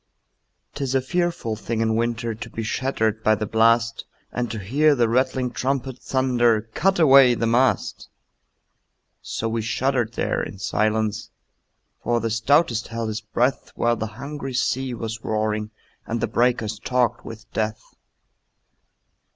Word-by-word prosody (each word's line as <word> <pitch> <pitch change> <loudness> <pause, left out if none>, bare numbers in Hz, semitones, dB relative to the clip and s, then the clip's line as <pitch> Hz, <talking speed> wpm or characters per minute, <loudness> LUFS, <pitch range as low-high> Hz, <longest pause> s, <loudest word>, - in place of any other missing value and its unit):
'Tis 135 -2 -2
a - - +5
fearful 170 -5 -1
thing 110 +1 -4
in 110 0 +1
winter 115 0 -1
To 115 +1 -8
be 115 - -5
shattered 110 -2 -1
by 110 - +4
the 110 - -3
blast, 115 +2 +2 0.3
And 120 -1 -2
to 110 - -4
hear 140 +10 +2
the 120 -3 +2
rattling 130 +1 +1
trumpet 130 -1 -2
Thunder, 120 -4 +2
"Cut 195 +2 +2
away 135 -6 +7
the 115 - -1
mast!" 120 -1 +1 1.1
So 115 - -3
we 115 0 -1
shuddered 120 +1 0
there - - -1
in - - -6
silence, 110 +2 -1 0.7
For 120 0 +1
the 115 0 -2
stoutest 120 +1 +2
held 115 -1 -3
his 110 0 -4
breath, 120 +5 -1
While 120 0 +1
the 110 - -3
hungry 135 -1 -6
sea 130 0 0
was 115 0 -5
roaring 110 0 -1 0.4
And 115 +1 -2
the - - +1
breakers 115 -3 0
talked 120 0 0
with 115 -1 -11
death. 110 0 -3
115 Hz, 145 wpm, -23 LUFS, 110-130 Hz, 1.1 s, away